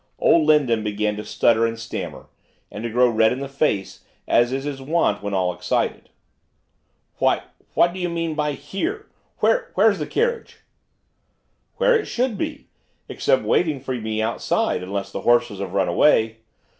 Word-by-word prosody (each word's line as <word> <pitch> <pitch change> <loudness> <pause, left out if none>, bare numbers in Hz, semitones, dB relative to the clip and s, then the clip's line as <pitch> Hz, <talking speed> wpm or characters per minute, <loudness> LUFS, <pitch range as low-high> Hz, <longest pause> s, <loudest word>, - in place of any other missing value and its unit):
Old 160 -2 +4
Lindon 130 -8 +3
began 105 0 -1
to 105 - -5
stutter 115 +1 +2
and 115 0 -4
stammer, 115 0 -6 0.4
and 105 - -7
to 120 - -2
grow 125 +2 +4
red 110 -1 +3
in 125 - -2
the 140 - -4
face, 135 -8 -1 0.2
as 120 +1 +3
is 135 +1 -2
his 140 -2 -5
wont 135 -8 0
when 100 0 -4
at 100 - 0
all 90 -1 0
excited. - - -2 1.1
'W - - +3 0.4
what 170 0 +4
do 190 - -7
you 180 -1 -1
mean 165 -1 -2
by 150 -1 -1
here? 360 - -4 0.4
wh - - +4
where's - - +4
the - - -3
carriage?' 470 0 -1 1.2
'Where 485 -2 +3
should 255 - -1
it 210 - -7
be, 305 -2 -4 0.4
except - - +1
waiting 155 -5 +1
for 130 0 -4
me 110 -2 -2
outside, 115 -4 0
unless 100 +1 -4
the - - -5
horses 120 -4 +2
have 95 -2 -5
run 95 -2 +2
away. 110 +4 +3
125 Hz, 170 wpm, -22 LUFS, 110-170 Hz, 1.2 s, Old